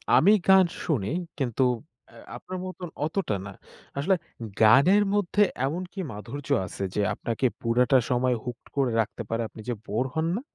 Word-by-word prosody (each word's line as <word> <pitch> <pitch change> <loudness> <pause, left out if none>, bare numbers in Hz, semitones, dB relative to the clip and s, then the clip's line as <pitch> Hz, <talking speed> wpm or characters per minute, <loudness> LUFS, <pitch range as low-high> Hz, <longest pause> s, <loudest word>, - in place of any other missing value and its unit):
আমি 195 - +6 0.2
গান 190 -1 +7 0.2
শুনি 120 - 0 0.3
কিন্তু 130 -2 0 0.5
অ্যা - - -17 0.2
আপনার 185 - -7
মতন 185 -1 -6 0.2
অতটা 160 - -1
না। 100 - -7 0.5
আসলে 175 +8 +2 0.5
গানের 140 - +6
মধ্যে 205 0 +1 0.2
এমন 160 +7 -2
কী 200 - -7
মাধুর্য 120 +7 -8 0.2
আছে 100 - -6
যে 105 - +1
আপনাকে 115 +3 -2 0.2
পুরোটা 125 +2 +3
সময় 125 0 +2
হুকড 125 -1 -7
করে 135 -3 +1
রাখতে 110 +2 -5
পারে 115 +1 -1
আপনি 110 - -11
যে - - +1
বোর 115 +4 -1
হন 160 0 +1
না? 225 - -3
135 Hz, 165 wpm, -26 LUFS, 115-180 Hz, 0.5 s, গান